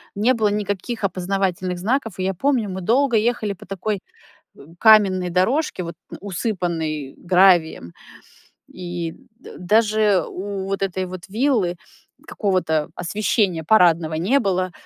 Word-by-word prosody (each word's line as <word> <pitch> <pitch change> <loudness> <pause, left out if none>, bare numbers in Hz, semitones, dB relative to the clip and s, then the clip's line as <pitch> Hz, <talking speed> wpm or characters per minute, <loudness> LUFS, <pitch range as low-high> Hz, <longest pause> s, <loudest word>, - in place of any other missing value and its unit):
не 220 +6 +2
было 220 -4 +1
никаких 205 +2 -3
опознавательных 185 -1 -2
знаков. 225 0 -2
И 185 - -1
я 190 - 0
помню, 240 +1 0
мы 190 0 -5
долго 245 +6 +2
ехали 220 -2 0
по 185 - -14
такой, 195 +2 -3 0.6
э, - - -17 0.2
каменной 195 -4 +5
дорожке, 190 - 0
вот, 170 0 -6 0.3
усыпанной 170 - -3
гравием. 175 - +3 0.8
И 175 -2 -6 0.3
дэ - - -12
даже 210 -1 +2
у 195 0 -5
вот 195 0 -3
этой 190 -1 -2
вот 180 0 -9
виллы 215 -4 0 0.5
какого-то 170 -7 -1
освещения 185 -1 0
парадного 170 -4 +3
не 190 - +2
было. 185 -4 -1
190 Hz, 130 wpm, -21 LUFS, 175-215 Hz, 0.8 s, каменной